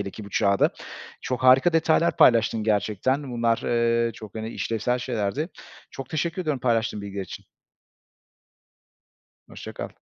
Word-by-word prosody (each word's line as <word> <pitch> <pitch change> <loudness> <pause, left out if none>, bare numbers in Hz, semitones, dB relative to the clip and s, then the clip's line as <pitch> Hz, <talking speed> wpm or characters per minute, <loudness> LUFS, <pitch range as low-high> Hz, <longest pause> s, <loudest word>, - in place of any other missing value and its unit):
hele 100 -1 -4
ki 105 - -10
bu 100 - -11
çağda. 100 -1 +2 0.5
Çok 125 -1 -3
harika 130 +6 +6
detaylar 165 +1 +2
paylaştın 115 -2 +4
gerçekten. 110 +6 0
Bunlar, 115 -1 +1
ııı, 115 0 +1
çok, 110 -2 -11
hani, 110 0 -5
işlevsel 115 +2 -2
şeylerdi. 120 - -2 0.4
Çok 135 - -8
teşekkür 170 +3 -2
ediyorum 150 -6 -2
paylaştığın 115 -3 0
bilgiler 100 -1 -5
için. - - -10 2.0
Hoşça - - -9
kal. - - -5
115 Hz, 140 wpm, -24 LUFS, 110-130 Hz, 2.0 s, harika